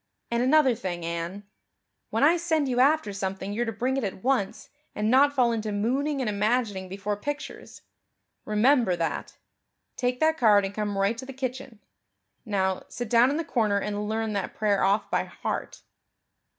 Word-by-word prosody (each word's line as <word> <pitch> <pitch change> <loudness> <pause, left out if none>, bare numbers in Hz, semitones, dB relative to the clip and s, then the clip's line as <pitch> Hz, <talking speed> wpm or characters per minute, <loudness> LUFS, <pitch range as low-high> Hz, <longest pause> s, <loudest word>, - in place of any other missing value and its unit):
And 235 0 +1
another 265 0 +4
thing, 180 -7 -5
Anne, 170 +4 -4 0.7
when - - 0
I 320 +4 +6
send 320 -4 0
you 250 -1 0
after 275 -5 +3
something 195 0 -4
you're 235 +3 -1
to - - -1
bring 250 +5 -1
it 270 - -1
at 190 -2 -4
once 250 -7 -1 0.2
and 210 +1 0
not 280 +3 +5
fall 250 -4 +2
into 220 -2 -2
mooning 265 +8 0
and 250 - -1
imagining 210 -2 0
before 200 +2 -3
pictures. 290 +8 -7 0.6
Remember 220 -1 +3
that. 165 -1 -3 0.6
Take 250 0 -1
that 315 0 +2
card 210 -4 +5
and 195 - -5
come 205 -1 -2
right 200 +4 +1
to 260 - -6
the 270 - -7
kitchen. 255 -3 -5 0.6
Now, 190 -3 0
sit 240 -3 -6
down 240 +2 +6
in 290 - -1
the 330 - -1
corner 220 -8 +1
and 210 +1 -3
learn 220 0 -1
that 200 -2 -3
prayer 205 -2 +1
off 200 +3 +1
by - - +1
heart." - - -5
220 Hz, 175 wpm, -26 LUFS, 200-260 Hz, 0.7 s, I